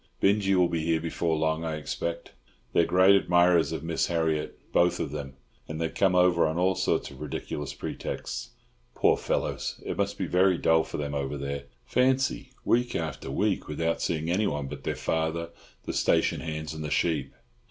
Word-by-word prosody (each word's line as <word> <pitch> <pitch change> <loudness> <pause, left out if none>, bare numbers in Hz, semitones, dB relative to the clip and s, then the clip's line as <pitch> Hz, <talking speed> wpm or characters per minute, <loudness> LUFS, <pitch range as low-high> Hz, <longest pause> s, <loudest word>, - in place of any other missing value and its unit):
Binjie 100 -1 +3
will 90 -1 +5
be 85 -2 -2
here 80 0 +2
before 80 0 -1
long, 80 +1 0
I 80 -1 -2
expect. 85 +2 -4 0.4
They're 85 - +4
great 95 +3 +6
admirers 90 -4 +4
of 80 - -4
Miss 80 0 0
Harriott, 80 -3 -1 0.2
both 90 0 +3
of 70 - -2
them, 70 -3 -6 0.3
and 80 0 -5
they 80 -1 0
come 95 +1 +2
over 90 -2 +4
on 80 +1 -2
all 95 +2 +3
sorts - - 0
of - - -12
ridiculous 75 -2 -5
pretexts. - - -5 0.5
Poor - - +4
fellows, - - -2
it - - -3
must 100 0 -1
be 95 - -1
very 90 +1 +3
dull 80 -1 +3
for - - -6
them 75 -1 -3
over 70 0 -2
there. 70 0 -4 0.2
Fancy, 130 +1 +1 0.2
week 120 +1 +2
after 80 -4 -3
week 100 +8 0
without 80 +2 -1
seeing 80 -1 -1
anyone 90 -7 0
but - - -8
their - - -1
father, 80 +1 -1 0.3
the - - -3
station - - +2
hands, 80 -1 -4
and 80 0 -6
the 75 - -3
sheep! 75 -4 0
80 Hz, 185 wpm, -27 LUFS, 80-90 Hz, 0.5 s, great